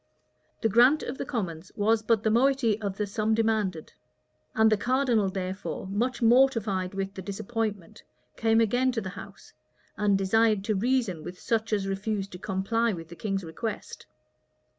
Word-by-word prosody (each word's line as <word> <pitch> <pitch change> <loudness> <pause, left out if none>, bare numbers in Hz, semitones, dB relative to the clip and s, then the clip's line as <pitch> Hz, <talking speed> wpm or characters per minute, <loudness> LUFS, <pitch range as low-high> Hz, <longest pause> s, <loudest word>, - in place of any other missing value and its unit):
The 225 - +3
grant 245 +8 +5
of 255 - -5
the - - -4
commons 185 - -4
was 215 +2 +2
but 220 -1 +1
the 220 - +2
moiety 240 -3 +2
of 200 -2 -3
the 210 - 0
sum 215 +2 0
demanded; 215 -7 -1 0.6
and 220 0 +4
the - - +5
cardinal, 240 -3 +1
therefore, 190 +1 -4
much 240 +5 -1
mortified 225 -7 +3
with 195 0 -3
the 190 - -7
disappointment, 205 0 -4 0.3
came 225 0 +2
again 245 +4 +2
to 225 - -1
the 190 - -5
house, 200 +1 -12 0.4
and 205 -1 +2
desired 210 +1 +2
to 215 - 0
reason 220 -6 0
with 180 +3 -8
such 225 -1 -1
as 205 -2 0
refused 195 0 -3
to 180 - -9
comply 215 +5 0
with 165 -2 -8
the 170 - -10
king's 195 +2 -3
request. 175 +7 -6
215 Hz, 165 wpm, -27 LUFS, 195-230 Hz, 0.6 s, grant